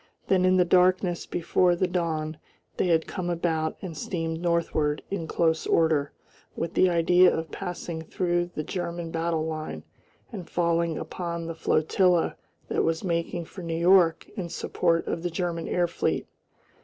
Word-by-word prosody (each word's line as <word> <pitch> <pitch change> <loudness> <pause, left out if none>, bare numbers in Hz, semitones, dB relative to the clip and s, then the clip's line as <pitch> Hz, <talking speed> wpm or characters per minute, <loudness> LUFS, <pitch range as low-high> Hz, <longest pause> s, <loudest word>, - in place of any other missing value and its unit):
Then 185 -1 +4
in 185 0 +4
the 180 - +4
darkness 180 0 +3
before 175 +1 +2
the 185 - +1
dawn 160 -3 -2 0.4
they - - +1
had 165 -2 +3
come 180 -3 -4
about 165 -2 -1
and 175 -4 -5
steamed 165 +1 -3
northward 170 -3 0
in 175 -5 -3
close 160 0 +1
order 155 -3 +2 0.4
with 165 - -3
the 185 - +4
idea 175 +1 +5
of 160 -2 -3
passing 170 -2 -5
through 175 +1 -1
the 155 - -2
German 170 -1 -4
battle 165 -1 -1
line 155 -1 -5 0.5
and 190 -7 -7
falling 170 -1 +1
upon 170 +1 -4
the 165 - -4
flotilla 170 +2 +2 0.3
that - - 0
was 165 0 0
making 170 -1 -2
for 185 - -10
New 165 -1 -3
York 175 -1 +4
in 185 -6 -4
support 170 0 0
of 165 - -3
the 175 - -1
German 170 -1 -3
air 175 -1 +1
fleet. 170 - -1
170 Hz, 160 wpm, -26 LUFS, 165-180 Hz, 0.5 s, idea